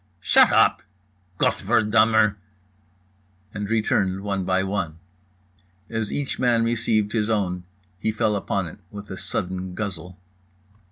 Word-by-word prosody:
_"—"Shut 95 - +5
up"—"Gott 90 -2 0
ver - - +2
dummer"—and 100 -2 -2
returned 100 -4 +1
one 100 -1 -2
by 95 +1 +1
one. 95 -5 -3 0.9
As 110 -2 -2
each 145 -2 -3
man 120 -2 +3
received 115 -2 0
his 110 -1 0
own, 90 -5 -1 0.3
he 110 - 0
fell 110 -1 0
upon 100 -1 -1
it 85 - -10
with 100 +1 -9
a - - -4
sudden 90 0 -4
guzzle. 90 -3 -5
100 Hz, 120 wpm, -23 LUFS, 95-110 Hz, 0.9 s, Shut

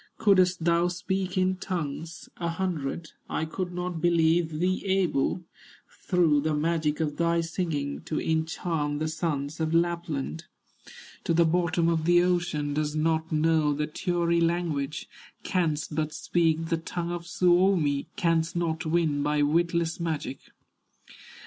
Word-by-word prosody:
"Couldst 185 -5 +3
thou 170 0 +3
speak 185 +1 -2
in 185 0 +2
tongues 170 -3 -5
a 170 -1 -2
hundred, 165 -3 -3 0.2
I 160 - -1
could 180 +3 -4
not 180 -2 -4
believe 165 -1 +2
thee 185 +3 0
able, 185 -3 +1 0.5
Through 175 - +2
the 155 +1 0
magic 155 0 0
of 150 -2 -1
thy 170 0 +2
singing, 165 -4 -3
To 155 - -2
enchant 160 -2 -1
the 155 +1 -1
sons 155 -2 -3
of 160 0 0
Lapland 165 - -1 0.8
To 165 - +1
the 170 0 +5
bottom 170 0 +1
of 165 -2 +1
the 175 +1 +5
ocean; 170 -5 0
Dost 150 0 -1
not 160 +1 0
know 155 -1 +2
the 150 +1 -1
Tury 170 +2 0
language, 165 -4 -1 0.4
Canst 160 -5 -1
but 155 0 -1
speak 165 -1 +1
the 165 - +1
tongue 170 +1 -4
of 175 0 -5
Suomi, 175 -5 +2
Canst 165 -1 +1
not 165 -1 -1
win 155 -3 +1
by 150 0 +1
witless 170 +2 +1
magic." 155 -5 -3
165 Hz, 140 wpm, -27 LUFS, 155-175 Hz, 0.8 s, the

